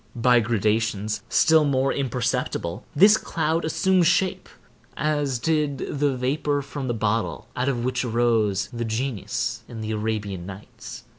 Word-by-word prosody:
By 120 0 +4
gradations, 110 -1 0
still 160 -1 +5
more 135 -2 +1
imperceptible, 125 -7 -2
this 205 +7 +7
cloud 160 +1 -1
assumes 180 +2 +2
shape, 185 +1 +1 0.5
as 145 -3 0
did 150 +1 0 0.2
the 140 -3 +1
vapor 145 +3 -1
from 135 -1 -6
the 120 - -1
bottle 110 +1 -1
out 125 +2 0
of 120 -3 -2
which 130 0 -1
arose 115 -4 +1
the 120 0 -3
genius 115 -1 -2
in 115 -3 -8
the 110 0 -4
Arabian 105 -4 -3
Nights. 100 +1 -10
125 Hz, 140 wpm, -24 LUFS, 110-145 Hz, 0.5 s, this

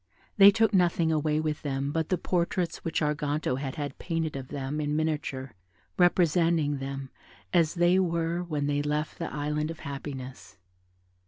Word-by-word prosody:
They 200 0 +10
took 220 +1 +2
nothing 170 -3 +3
away 155 -1 +1
with 155 -1 -2
them 140 -1 -2
but 160 0 -1
the 185 - +2
portraits 175 0 -1
which 165 0 -2
Arganto 150 -3 -1
had 135 -2 -4
had 145 -3 -5
painted 165 -3 -2
of 135 -2 -5
them 140 +2 -3
in 150 0 -1
miniature, 150 -4 -2 0.4
representing 170 -4 +3
them 135 0 -5 0.4
as 170 -2 +3
they 175 +2 +4
were 170 -1 0
when 155 -5 -2
they 145 0 +1
left 150 +1 -2
the 165 - -3
Island 150 +1 -2
of 165 - -7
Happiness. 135 -2 -7
155 Hz, 160 wpm, -28 LUFS, 145-170 Hz, 0.4 s, They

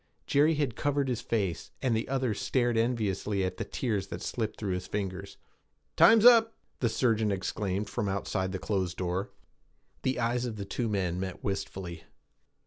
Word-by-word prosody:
Jerry 150 +3 +4
had 145 -6 -1
covered 145 -1 0
his 120 -3 -1
face, 100 -7 -2
and 125 -4 +1
the 110 - -2
other 130 -4 0
stared 120 +3 0
enviously 105 -4 0
at 95 - -2
the - - -2
tears 105 -7 -2
that - - -6
slipped 110 -3 -3
through 100 -4 -1
his 90 0 -4
fingers. 100 -1 -4 0.6
'Time 225 - +8
is 220 - +3
up!' 225 -2 +7 0.2
the 120 - +2
surgeon 110 -3 +2
exclaimed 100 +1 -2
from 100 - -2
outside 95 -1 -1
the 95 - -2
closed 95 0 -2
door. 90 +2 -2 0.7
The 130 -1 0
eyes 120 +1 0
of 115 -3 -4
the 100 -2 -5
two 115 +3 -2
men 90 -4 -1
met 95 -1 -5
wistfully. 95 -4 -4
105 Hz, 175 wpm, -29 LUFS, 95-125 Hz, 0.7 s, Time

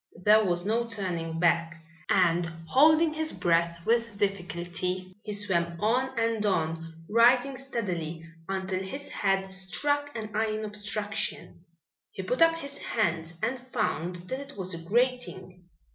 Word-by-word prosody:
There 215 +2 +6
was 175 -2 0
now 220 +3 +2
no 235 - -2
turning 170 -7 -2
back, 170 -1 +2 0.3
and 175 -2 +4 0.2
holding 310 - +5
his 315 0 -1
breath 170 0 +1
with 230 -2 +1
difficulty, 185 -1 -2
he 210 - -6
swam 170 -5 -1
on 250 +4 +1
and 230 -2 +1
on, 165 -3 -1
rising 245 +5 +4
steadily 180 - -4 0.3
until 190 -1 -2
his 275 +10 -6
head 195 -1 0
struck 285 +10 0
an 215 -2 -5
iron 215 0 0
obstruction. 205 -3 -3 0.5
He - - -6
put - - -1
up 330 0 +6
his 280 -3 -6
hands 170 -6 -1
and 250 +3 0
found 180 -8 -2 0.2
that 260 - -1
it 280 -3 -10
was 185 -1 -3
a 170 - -4
grating. 185 -3 -1
200 Hz, 145 wpm, -28 LUFS, 175-235 Hz, 0.5 s, There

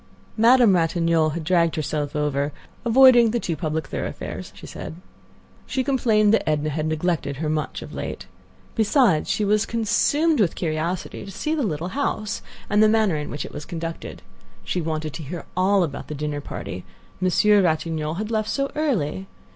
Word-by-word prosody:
Madame 235 -1 +6
Ratignolle 165 -2 +2
had 170 - -3
dragged 170 0 +2
herself 150 -1 -2
over, 145 -1 0 0.3
avoiding 240 -1 +7
the 235 +2 0
too 170 -6 -2
public 155 +1 -2
thoroughfares, - - -5
she - - -11
said. - - -7 0.7
She 265 -1 -1
complained 225 -6 +3
that 225 - +2
Edna 150 0 0
had 155 +1 -2
neglected 155 -3 -1
her 155 +2 -3
much 155 -1 -3
of - - -10
late. - - -5 0.5
Besides, 220 - +3
she 210 - +1
was 205 0 +2
consumed 290 +7 +2
with 190 -6 +2
curiosity 165 +2 -3
to 200 - -9
see 305 - -3
the 315 - 0
little 175 - -2
house 215 -2 -2 0.3
and 210 0 +3
the 215 - +6
manner 215 -5 +3
in 150 -1 -4
which 145 - -4
it - - -10
was 150 - -6
conducted. 165 +1 -6 0.4
She 180 - -2
wanted 155 -2 -3
to 160 - -6
hear 170 +5 -6
all 190 +1 +3
about 140 -4 -5
the 150 - -5
dinner 145 0 -3
party; 90 -9 -6 0.4
Monsieur 200 +3 +4
Ratignolle 160 -2 0
had 215 +4 -4
left 215 -1 0
so 275 0 -1
early. 195 - -1
175 Hz, 175 wpm, -23 LUFS, 155-215 Hz, 0.7 s, avoiding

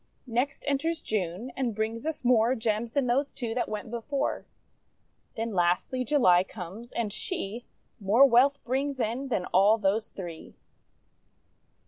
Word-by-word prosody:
Next 250 +3 -2
enters 320 +4 0
June, 205 +3 -3
and 245 -5 -1
brings 225 +5 -3
us 315 -5 -4
more 240 0 +4
Gems 225 0 -1
than 280 -2 +1
those 270 +4 +1
two 235 -4 -4
that 245 - -1
went 215 +1 -5
before. 240 +4 -2 0.9
Then, 225 -1 -3
lastly, 180 +8 +1
July 200 -10 +4
comes, 195 +5 -9
and 220 -4 -2
she 235 - -3 0.3
More 215 +7 +5
wealth 275 +3 +4
brings 270 +2 -1
in 240 +4 -1
than 195 -8 -1
all 200 +4 +5
those 210 +1 0
three. 170 -4 -9
230 Hz, 140 wpm, -28 LUFS, 210-265 Hz, 0.9 s, More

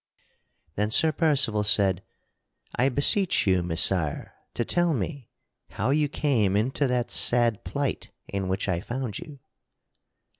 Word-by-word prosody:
Then 105 +5 -1
Sir 160 +8 +4
Percival 140 -10 +2
said: 100 -3 +3 0.7
"I 130 +3 +2
beseech 155 - +2
you, 95 -2 +2
Messire, 85 -2 -1 0.2
to 120 - -2
tell 175 -3 0
me 125 +3 -5 0.4
how 130 - -2
you 150 0 +1
came 115 -10 0
into 130 +6 0
that 125 -1 -2
sad 120 -3 +2
plight - - -4 0.2
in 100 -1 -4
which 95 +2 -2
I 90 -3 -1
found 120 +1 -5
you." 155 -4 -11
120 Hz, 135 wpm, -25 LUFS, 100-140 Hz, 0.7 s, Sir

